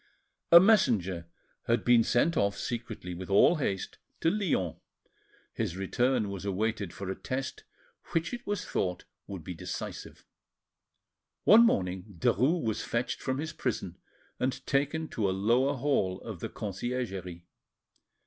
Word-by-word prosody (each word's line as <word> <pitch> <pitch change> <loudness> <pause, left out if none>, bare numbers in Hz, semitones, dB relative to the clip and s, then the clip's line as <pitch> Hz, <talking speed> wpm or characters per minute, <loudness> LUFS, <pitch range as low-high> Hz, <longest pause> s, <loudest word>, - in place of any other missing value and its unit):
A 170 - +12
messenger 105 - +3 0.4
had 115 -1 +1
been 120 -1 +6
sent 135 +9 +2
off 100 -4 +1
secretly 110 -7 -5
with 90 +2 -7
all 100 - +5
haste 100 -10 -3 0.2
to 165 - +3
Lyons; 160 - 0 0.8
his 85 - -3
return 115 +2 +1
was 100 -1 -6
awaited 100 -1 -1
for 95 -1 -5
a - - -3
test 130 +1 -5 0.4
which 165 +7 -2
it 240 - -6
was 205 -2 -2
thought 90 -1 -2 0.2
would 95 -5 -7
be 90 - -5
decisive. 80 - -7 1.2
One 225 +2 +8
morning 95 - -2
Derues 135 - +2
was 110 -2 -1
fetched 120 +1 -2
from 130 0 -1
his 155 +2 -4
prison 110 - -3 0.4
and 130 +1 -2
taken 145 +3 0
to 105 -4 0
a 95 - -1
lower 125 +8 +2
hall 120 -9 0
of 110 -7 -7
the - - -4
Conciergerie. 95 -5 -4
110 Hz, 140 wpm, -29 LUFS, 95-135 Hz, 1.2 s, A